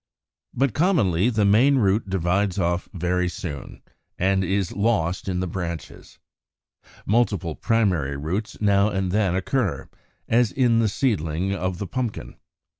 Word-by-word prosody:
But 135 -2 +1
commonly 120 - +2
the 110 -4 +1
main 120 +8 +5
root 100 -2 +1
divides 95 +1 0
off 85 -1 -1
very 90 0 -1
soon, 90 -8 -7 0.3
and 95 +1 +1
is 95 0 -1
lost 100 -5 0
in 90 -1 -1
the 95 - -2
branches. 85 -4 -6 0.9
Multiple 100 -7 +1
primary 90 - 0
roots 90 +9 -4
now 100 0 +3
and 95 -2 -2
then 100 -3 +1
occur, 100 +2 -1 0.4
as 120 0 +3
in 120 -3 +2
the 110 -2 +2
seedling 95 - -1
of 95 -1 -2
Pumpkin 125 -4 -3
(Fig. - - -19
95 Hz, 135 wpm, -23 LUFS, 90-110 Hz, 0.9 s, main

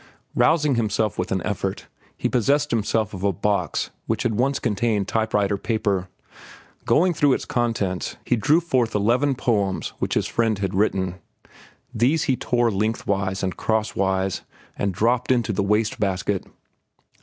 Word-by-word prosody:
Rousing 150 -3 +3
himself 110 -4 0
with 90 - -2
an 95 -3 0
effort, 100 -1 -3 0.3
he - - 0
possessed 140 +4 +1
himself 110 -1 0
of 95 -1 -6
a 100 - +3
box 100 -3 -1 0.2
which - - -1
had 115 - +1
once 130 +5 +1
contained 105 -2 0
type 110 -1 0
writer 100 -1 +1
paper. 100 -5 -1 0.8
Going 180 +2 +3
through 145 -3 +3
its - - -2
contents, 110 -7 -1
he - - +2
drew 145 +10 +3
forth 125 -9 0
eleven 120 +7 +2
poems 100 -7 0
which - - -1
his - - +1
friend 115 -2 0
had 95 -1 -2
written. 95 -2 0 0.7
These 130 +8 +2
he 130 - +1
tore 120 -1 +1
lengthwise 100 -2 -1
and 95 -1 -1
crosswise 95 -4 0 0.3
and 100 - -1
dropped 120 +7 +1
into 120 -4 +1
the 100 - 0
waste 105 +2 +1
basket. 95 -1 -1
110 Hz, 155 wpm, -23 LUFS, 95-120 Hz, 0.8 s, Rousing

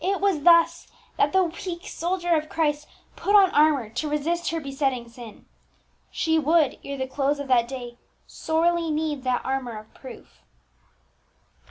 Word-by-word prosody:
It 390 +2 0
was 390 -6 +1
thus 335 +1 +4 0.3
that 285 - +2
the 380 0 +3
weak 345 +1 -6
soldier 350 0 -1
of 310 0 -2
Christ 300 -2 -1 0.3
put 405 - +1
on 390 -3 +6
armour 295 -5 +3
to 295 +7 -3
resist 330 +4 -1
her 330 - -2
besetting 270 -4 -2
sin. 230 -2 -13 0.6
She 320 0 0
would, 310 -1 +2
ere 280 0 -6
the 260 - -2
close 275 +2 -1
of 285 -1 -6
that 240 -2 +3
day, 245 -2 -8 0.3
sorely 335 +1 0
need 305 -3 -2
that 250 -1 -1
armour 260 -4 -3
of 215 0 -13
proof. 240 - -13
300 Hz, 160 wpm, -24 LUFS, 265-335 Hz, 0.6 s, on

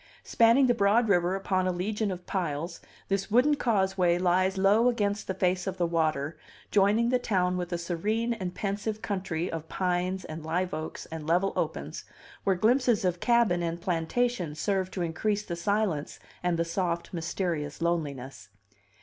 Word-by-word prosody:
Spanning 235 +3 +4
the 245 - +4
broad 225 +2 +3
river 180 -1 +3
upon 185 -1 0
a - - +2
legion 205 +4 -1
of 180 -1 -6
piles, 170 -2 -3 0.3
this 195 +1 -1
wooden 250 +7 +4
causeway 190 -9 +2
lies 185 +2 +2
low 205 +5 +4
against 210 -3 -1
the 190 - -2
face 185 0 0
of 190 -1 -3
the 175 - +1
water, 160 -3 -1 0.3
joining 210 +4 +3
the 250 0 +2
town 185 -6 +1
with 180 -1 -3
a 175 - 0
serene 210 +8 -1
and 185 -5 -5
pensive 210 +2 -3
country 185 -4 -2
of 160 -1 -6
pines 185 0 -1
and 155 0 -7
live 180 +3 -1
oaks 155 0 -5
and 160 -1 -6
level 180 +4 +2
opens, - - -3 0.4
where 195 -1 +3
glimpses 235 +1 +2
of 180 -1 0
cabin 235 -7 +3
and 170 0 -2
plantation 180 +1 -1
serve 190 +3 0
to 185 - -3
increase 205 +6 -1
the 175 - -4
silence 185 -4 -1 0.2
and 180 -1 0
the 170 - +1
soft, 170 0 -2
mysterious 165 -3 -3
loneliness. 140 -8 -3
185 Hz, 165 wpm, -28 LUFS, 170-205 Hz, 0.4 s, Spanning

